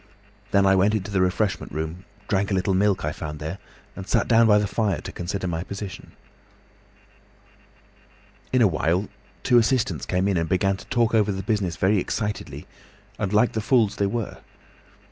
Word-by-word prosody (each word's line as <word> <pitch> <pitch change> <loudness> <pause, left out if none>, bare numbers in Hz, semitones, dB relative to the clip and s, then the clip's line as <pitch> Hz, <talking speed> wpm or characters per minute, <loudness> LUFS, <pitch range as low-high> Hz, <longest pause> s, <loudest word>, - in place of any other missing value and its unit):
Then 100 -1 +3
I 95 - +5
went 100 +3 +3
into 100 -1 -3
the 95 -2 +1
refreshment 95 +2 0
room, 80 +5 -5 0.2
drank 100 0 0
a 100 - 0
little 95 +1 +1
milk 100 -2 +2
I 75 - -1
found 75 0 -6
there, 80 +6 -6 0.4
and 95 +1 -8
sat - - +1
down 115 -1 +5
by 105 -1 +6
the 105 - +1
fire 105 0 -1
to 95 - -7
consider 95 +2 -4
my 85 -2 -2
position. 100 0 -8 2.4
"In 130 -2 +4
a - - +6
little 90 -6 0
while 90 +6 +1 0.3
two 120 - +5
assistants 110 - 0
came 90 +1 +1
in 100 -3 +1
and 80 -1 -1
began 95 +1 +2
to - - -12
talk 120 -3 +1
over 105 -2 +3
the 95 0 -4
business 100 -5 -1
very 95 +5 +2
excitedly 105 +3 -4 0.5
and 100 - -1
like 105 +3 +3
the 110 - -2
fools 110 -2 +2
they 100 - +1
were. 110 +1 -4
100 Hz, 185 wpm, -24 LUFS, 90-105 Hz, 2.4 s, by